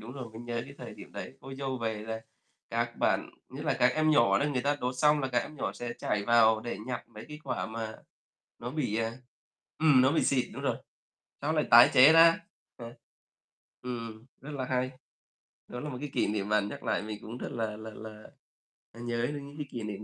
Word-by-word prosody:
đúng 115 +3 -9
rồi, 130 -4 -7
vẫn 115 +2 -9
nhớ 120 -1 -3
cái 140 +1 -12
thời - - -8
điểm - - -12
đấy. - - -6
Cô 135 +1 -8
dâu 135 -1 -3
về 110 -2 -2
là 110 +1 -4 0.5
các - - -1
bạn, - - +1 0.2
nhất - - -7
là - - +2
các 125 +1 +5
em 155 0 +3
nhỏ 115 -9 +5
đó, - - +1
người 125 -2 0
ta 145 +1 +1
đốt 125 +1 -1
xong 150 +1 +4
là 130 - -1
các 125 -1 +2
em 155 - -10
nhỏ - - -2
sẽ 120 0 -5
chảy 100 -1 -1
vào 110 -1 +5
để 120 - -5
nhặt 125 -2 -5
mấy 110 -1 -11
cái 150 0 -8
quả - - -2
mà 110 -1 -5 0.6
nó 120 +1 -5
bị, 135 -7 -1
à 115 +1 -2 0.6
ừm, 150 -5 +6
nó 130 +2 +4
bị 160 - +2
xịt, 130 -3 +2
đúng - - -6
rồi, - - +1 0.7
xong 155 +3 0
lại 155 - +2
tái 120 +1 +9
chế 135 +4 +9
ra. 165 0 +7 0.4
Ừ. 115 -1 -8 0.9
Ừm, 115 -3 -6 0.2
rất 150 - -9
là 135 -3 -3
hay. 130 0 0 0.8
Đó 125 - -6
là 150 +3 -5
một 125 - -5
cái 150 - -4
kỷ - - +2
niệm 105 -1 -2
mà 105 0 +4
nhắc 100 0 -5
lại 110 - 0
mình 105 0 -6
cũng 115 +3 -8
rất - - -5
là 110 -2 -3
là 110 0 -8
là, 110 0 -10 0.7
à, 115 - -14
nhớ 120 0 -1
đến 145 -1 -5
những 145 +1 -12
cái 150 -2 -5
kỷ 120 - -5
niệm 105 -1 -5
120 Hz, 235 wpm, -30 LUFS, 110-140 Hz, 0.9 s, tái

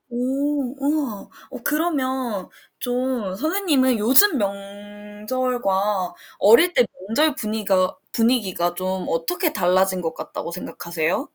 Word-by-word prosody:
오 265 +2 -1
우와 280 -7 -2 0.2
어 - - -7
그러면 265 - -1 0.3
좀 245 -5 -2
선생님은 290 - +1
요즘 265 - +6
명절과 205 0 -2 0.2
어릴 280 - +6
때 245 - +4 0.2
명절 300 +6 +2
분위가 210 -7 0 0.2
분위기가 205 -7 +1
좀 185 0 -3
어떻게 330 - 0
달라진 185 +1 +2
것 165 -1 -3
같다고 170 - -6
생각하세요? 170 - -3
225 Hz, 240 characters per minute, -22 LUFS, 190-265 Hz, 0.3 s, 요즘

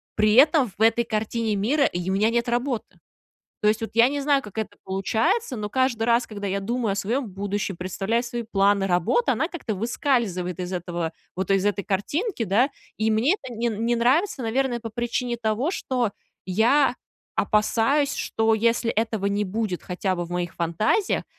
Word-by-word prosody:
При 215 0 +3
этом 280 -3 +5
в - - -8
этой 225 +1 +4
картине 220 0 -1
мира 265 +9 +2
й 175 +1 -3
у - - +1
меня 210 +3 +3
нет 235 0 0
работы. 240 0 -1 0.8
То 210 - +2
есть, 215 +1 0
вот 225 - -3
я 230 +1 +6
не 285 0 -2
знаю, 280 -1 +3
как 205 0 -12
это 205 -2 -4
получается, 220 - 0
но 210 -1 -3
каждый 260 -2 +1
раз, 235 +1 +3
когда 205 -2 -5
я 195 +1 -1
думаю 230 0 -1
о - - -4
своем 235 +6 -1
будущем, 200 0 -3
представляю 195 +6 -1
свои 240 -1 -4
планы 200 -2 +2
работы, 180 - +2
она 320 - 0
как-то 275 - -4
выскальзывает 205 - -1
из 180 0 -4
этого, 175 -2 -3 0.2
вот 190 +2 -2
из 195 0 +2
этой 205 -1 0
картинки, 285 - -1
да. 220 +8 +3 0.3
И 220 +1 +1
мне 230 - +3
это 260 -4 -8
не 235 +1 -1
не 230 +2 0
нравится, 265 - +2
наверное, 240 +1 0
по 225 - -5
причине 240 +2 -2
того, 230 +7 0
что 250 - -1 0.3
я 245 +8 +3 0.4
опасаюсь, 240 +7 +2
что 225 0 +1
если 230 +1 +1
этого 220 -2 -1
не 200 +1 0
будет 200 -2 -3
хотя 185 +1 -2
бы 175 - -2
в - - -13
моих 175 -1 -3
фантазиях, 195 - +1
225 Hz, 185 wpm, -24 LUFS, 200-245 Hz, 0.8 s, я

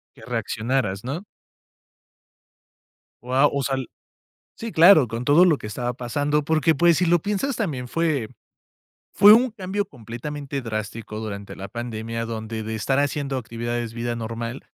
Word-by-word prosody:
Que - - -16
reaccionaras, 110 -4 -2
¿no? 155 +10 -4 2.0
Guau, 130 +4 +3
o 140 -1 0
sea 135 - 0
el 130 -3 -4 0.7
sí, 230 -1 -6
claro, 160 - +7
con 115 +3 -4
todo 150 +7 +6
lo 160 -5 +4
que 105 - -7
estaba 120 +3 -3
pasando, 145 +5 -1
porque, 160 +1 +2
pues, 170 +2 +4
si 180 - +2
lo 175 0 +4
piensas, 210 +7 -1
también 140 - -3
fue 150 -7 0 0.8
fue 205 +1 +8
un 245 +3 +5
cambio 200 -1 -3
completamente 140 +3 -6
drástico 110 -1 -5
durante 100 -2 -6
la 100 +1 -7
pandemia, 115 -1 -4
donde 110 -1 -5
de 110 +1 -4
estar 130 +6 0
haciendo 140 -1 -1
actividades 120 -1 -4
vida 120 0 -3
normal. 115 +2 -5
130 Hz, 150 wpm, -23 LUFS, 115-155 Hz, 2.0 s, fue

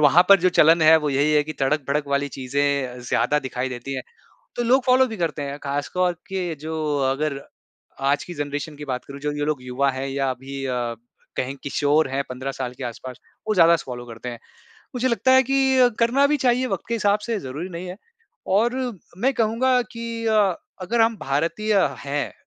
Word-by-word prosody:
वहाँ 150 +4 +6
पर 200 - +9
जो 185 - +4
चलन 165 +2 +6
है 160 +1 +8
वो 150 - +1
यही 140 +3 +2
है 150 -1 +4
कि 155 - -5
तड़क-भड़क 140 +1 0
वाली 140 0 0
चीजें 135 -1 -1
ज़्यादा 125 +6 +2
दिखाई 130 -2 -3
देती 125 +2 -6
हैं। 130 - -3 0.5
तो 240 - 0
लोग 255 +2 +3
फ़ॉलो 260 0 +5
भी 225 - -6
करते 165 -5 -2
हैं 140 0 -5
खास 140 0 -3
तौर 180 -1 +2 0.2
के 185 -3 -2
जो 160 +1 -5 0.4
अगर 140 0 -2 0.7
आज 145 +1 +1
की 175 - -8
ज़नरेशन 145 +1 -4
की 150 - -8
बात 130 -2 -4
करूँ 140 0 -10
जो 150 +1 -2
ये 145 0 -2
लोग 150 -4 -2
युवा 130 +2 0
है 135 +1 -4
या 135 -1 0
अभी 135 +1 -6
अ, 120 -2 -2 0.4
कहीं 130 +2 -2
किशोर 145 +1 +2
हैं 135 +1 0
15 130 +2 -5
साल 125 -2 -4
के - - -7
आस-पास, 125 +1 -7 0.3
वो 215 - +2
ज़्यादा 170 -2 +6
फ़ॉलो 120 -5 -7
करते 115 +1 -8
हैं। 120 -1 -6 0.6
मुझे 255 +1 +1
लगता 255 +2 +2
है 260 0 +7
कि 265 -1 +3
करना 245 +5 +4
भी 295 +1 +2
चाहिए 255 -1 +2
वक़्त 195 -7 -3
के 235 - 0
हिसाब 205 -2 +2
से 230 -2 -1
ज़रूरी 145 +8 -6
नहीं 175 +1 -7
है 180 - -7 0.6
और 240 +4 +2 0.4
मैं 265 +6 +2
कहूँगा 240 +3 +2
कि 230 0 -5 0.6
अगर 230 +6 0
हम 225 0 +3
भारतीय 170 +10 0 0.2
हैं 140 +1 -3
150 Hz, 200 wpm, -23 LUFS, 135-215 Hz, 0.7 s, पर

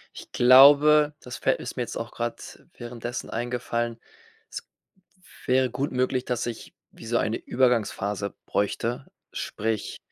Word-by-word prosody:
Ich - - -11
glaube, 145 +4 +6
das 125 0 -8
fällt 135 - 0
ist - - -7
mir 125 - -3
jetzt 120 - -4
auch 115 - -6
grade 120 0 -3 0.4
währenddessen 120 0 -6
eingefallen, 120 -1 -3 0.5
es - - -8 0.8
wäre 130 0 +2
gut 135 +4 -3
möglich, 130 0 -1
dass 120 -1 -2
ich 115 - -7 0.2
wie - - -14
so 115 +1 0
eine 110 - -1
Übergangsphase 105 -5 0
bräuchte. 115 +5 -2 0.3
Sprich, 110 -1 -3
120 Hz, 135 wpm, -25 LUFS, 115-130 Hz, 0.8 s, glaube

